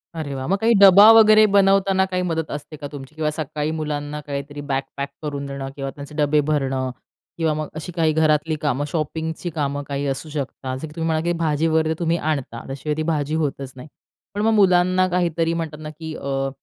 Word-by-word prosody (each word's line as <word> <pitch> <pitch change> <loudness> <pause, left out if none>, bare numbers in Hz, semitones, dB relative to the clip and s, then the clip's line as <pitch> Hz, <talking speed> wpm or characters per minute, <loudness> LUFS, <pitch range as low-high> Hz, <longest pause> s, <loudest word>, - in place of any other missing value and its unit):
अरे 155 -4 -4
वाह. 130 0 -4
मग 195 +3 +1
काही 230 +2 +3
डबा 200 +1 +9
वगैरे 215 -1 +7
बनवताना 195 -1 +4
काही 180 0 0
मदत 165 -3 -2
असते 150 +1 -7
का 145 -1 -6
तुमची? 145 0 -10
किंवा 155 -1 0
सकाळी 150 0 -3
मुलांना 150 -1 -4
काहीतरी 145 +1 -5
बॅग 135 0 +1 0.2
पॅक 140 0 -3
करून 145 -2 -4
देणं 140 -1 -5
किंवा 135 -1 -4
त्यांचे 145 0 -10
डबे 150 0 +2
भरणं 135 -3 0 0.5
किंवा 160 -2 +1
मग 155 0 -3
अशी 160 +3 -6
काही 160 -2 +2
घरातली 155 0 +2
कामं, 145 -1 0
शॉपिंगची 160 +2 -3
कामं 145 -1 -2
काही 140 0 -3
असू 135 +3 -4
शकतात 135 -3 -4
जसं 160 - -6
की 150 - -13
तुम्ही 165 -1 -2
म्हणा 160 -1 +1
की 175 - +1
भाजीवर 160 0 +1
तुम्ही 170 0 +1
आणता. 145 -7 -3
त्याशिवाय 140 +3 -3
ती 155 - -1
भाजी 155 -2 -1
होतचं 145 -3 -2
नाही. 130 +3 -10 0.5
पण 205 - -1
मग 225 +1 +3
मुलांना 185 -2 +4
काहीतरी, 170 -2 0
म्हणतात 165 -2 -4
ना, 155 - -6
की 160 +1 -8
अ, 135 0 -2
155 Hz, 200 wpm, -22 LUFS, 145-165 Hz, 0.5 s, डबा